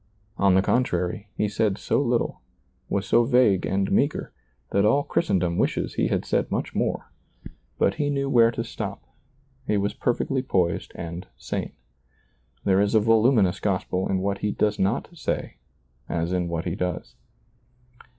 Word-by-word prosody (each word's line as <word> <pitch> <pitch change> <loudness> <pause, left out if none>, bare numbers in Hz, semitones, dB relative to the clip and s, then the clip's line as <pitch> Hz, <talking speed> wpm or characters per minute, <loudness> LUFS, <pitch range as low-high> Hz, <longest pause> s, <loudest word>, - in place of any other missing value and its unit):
On 100 -2 +4
the 95 - +4
contraiy, 100 -4 0
he 105 - +1
said 105 -1 0
so - - 0
little, 120 -3 0 0.5
was 100 0 -1
so 120 +4 +4
vague 120 -6 +3
and 95 0 0
meager, - - 0 0.4
that 100 - +3
all 135 +7 +3
Christendom 90 - 0
wishes - - 0
he - - +1
had - - -1
said - - 0
much - - -2
more; - - -2 0.7
but - - +2
he 145 - +1
knew 140 -1 0
where 120 -4 +5
to 115 0 -3
stop; 105 -3 -6 0.6
he 105 - +2
was 100 +1 0
perfectly 130 +2 0
poised 90 -9 0
and 85 +1 -6
sane. - - -4 0.9
There 95 0 +3
is 100 +2 +1
a - - +7
voluminous 110 -3 +3
gospel 95 -2 -1
in 95 -1 0
what 100 +1 -1
he 105 - -1
does 105 0 0
not 100 +5 0
say, - - -3 0.5
as 85 +1 -1
in 90 -1 0
what 85 0 -3
he 85 - -1
does. 90 -9 -3
100 Hz, 160 wpm, -25 LUFS, 90-115 Hz, 0.9 s, a